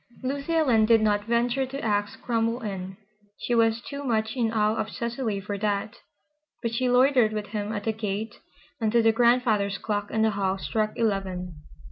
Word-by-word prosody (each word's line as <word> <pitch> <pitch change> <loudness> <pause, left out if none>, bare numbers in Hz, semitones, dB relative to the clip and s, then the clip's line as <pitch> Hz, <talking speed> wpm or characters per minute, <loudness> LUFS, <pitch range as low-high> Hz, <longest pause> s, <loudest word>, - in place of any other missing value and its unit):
Lucy 280 +5 -2
Ellen 250 -9 +4
did 230 0 +6
not 205 -1 +1
venture 240 +3 +1
to 275 +2 -6
ask 205 -4 -1
Cromwell 230 0 0
in. 190 -2 -5 0.4
She 245 - -2
was 225 -1 +3
too 280 +2 -7
much 220 -3 0
in 230 -3 0
awe 215 -1 +2
of 220 -1 -2
Cecily 235 -2 -3
for 200 0 -5
that. 210 +2 -1 0.7
But 230 -1 -1
she 250 +2 +1
loitered 250 -3 +4
with 210 -1 -4
him 210 0 -3
at 205 -2 -3
the 220 - 0
gate 215 0 -4 0.4
until 230 +1 +2
the 225 - +5
grandfather's 225 -4 +2
clock 205 -1 -3
in 220 - +1
the 220 - +3
hall 195 -1 -1
struck 215 +2 -1
eleven. 190 -5 -1
220 Hz, 180 wpm, -26 LUFS, 205-235 Hz, 0.7 s, did